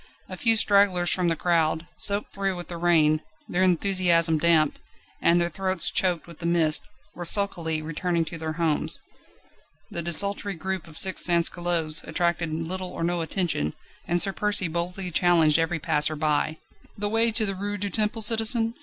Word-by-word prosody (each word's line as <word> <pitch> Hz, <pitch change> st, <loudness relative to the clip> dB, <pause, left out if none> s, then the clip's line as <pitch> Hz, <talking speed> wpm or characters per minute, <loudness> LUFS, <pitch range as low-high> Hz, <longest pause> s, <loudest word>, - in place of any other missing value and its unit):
A -, -, -8 dB
few 225 Hz, -2 st, +1 dB
stragglers 200 Hz, -5 st, +2 dB
from 180 Hz, -2 st, -1 dB
the 165 Hz, -, 0 dB
crowd, 165 Hz, -1 st, -1 dB
soaked 205 Hz, +1 st, +2 dB
through 195 Hz, -1 st, -3 dB
with 175 Hz, 0 st, -9 dB
the 170 Hz, -, -7 dB
rain, 160 Hz, -3 st, +1 dB, 0.3 s
their 180 Hz, -, -2 dB
enthusiasm 175 Hz, -3 st, +2 dB
damped, 160 Hz, -2 st, +1 dB, 0.4 s
and 170 Hz, +1 st, +2 dB
their 170 Hz, -, 0 dB
throats 185 Hz, +1 st, +1 dB
choked 180 Hz, -3 st, -1 dB
with 170 Hz, -2 st, -15 dB
the 170 Hz, -, -4 dB
mist, 165 Hz, -3 st, +2 dB, 0.3 s
were 175 Hz, -, -8 dB
sulkily 170 Hz, -4 st, +1 dB
returning 165 Hz, +1 st, -3 dB
to 165 Hz, +1 st, -9 dB
their 160 Hz, 0 st, -5 dB
homes. 160 Hz, -2 st, 0 dB, 0.9 s
The 170 Hz, -, -4 dB
desultory 200 Hz, +4 st, +1 dB
group 190 Hz, +1 st, -6 dB
of 160 Hz, -1 st, -10 dB
six 190 Hz, -1 st, +4 dB
sansculottes 170 Hz, -2 st, +2 dB
attracted 170 Hz, -2 st, -2 dB
little 180 Hz, +4 st, -5 dB
or 170 Hz, -, -7 dB
no 175 Hz, 0 st, -2 dB
attention, 160 Hz, -, -2 dB, 0.3 s
and 175 Hz, +1 st, 0 dB
Sir 195 Hz, +2 st, +5 dB
Percy 205 Hz, -3 st, +1 dB
boldly 180 Hz, +3 st, -4 dB
challenged 165 Hz, -2 st, +2 dB
every 165 Hz, +1 st, -1 dB
passer 155 Hz, -1 st, 0 dB
by. 155 Hz, +1 st, -2 dB, 0.4 s
"The 205 Hz, 0 st, -3 dB
way 225 Hz, +2 st, +1 dB
to 220 Hz, 0 st, +2 dB
the 195 Hz, -, -2 dB
Rue 205 Hz, +2 st, -5 dB
du 200 Hz, 0 st, -4 dB
Temple, 215 Hz, +1 st, 0 dB
citizen?" 225 Hz, +1 st, +3 dB
175 Hz, 170 wpm, -24 LUFS, 165-195 Hz, 0.9 s, Sir